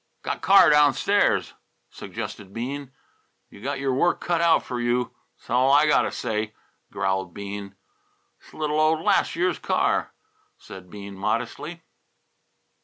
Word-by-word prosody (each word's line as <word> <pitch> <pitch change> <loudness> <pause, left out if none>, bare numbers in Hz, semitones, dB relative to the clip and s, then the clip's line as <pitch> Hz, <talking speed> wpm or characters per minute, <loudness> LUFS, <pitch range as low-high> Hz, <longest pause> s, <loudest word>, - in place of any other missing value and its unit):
"Got - - -3
car 190 -5 +7
downstairs," 150 +7 +3 0.4
suggested 100 -2 -7
Bean. 135 +3 -5 0.6
"You 100 - -14
got 135 +3 -3
your 135 -1 0
work 175 +7 +2
cut 170 -1 0
out 165 -1 +4
f'r 120 -1 -4
you; 120 0 0 0.2
'sall 125 +3 +1
I 145 +2 +6
got 150 -2 +4
t' - - -1
say," 105 +1 -3 0.4
growled 95 -2 -2
Breede. 100 -1 -7 0.7
"'S - - -17
little 150 0 -2
old 155 +1 +3
last 200 +2 +2
year's 175 0 0
car," - - 0 0.4
said 95 -1 -12
Bean 100 +1 -9
modestly. 115 - -3
130 Hz, 135 wpm, -24 LUFS, 105-155 Hz, 0.7 s, car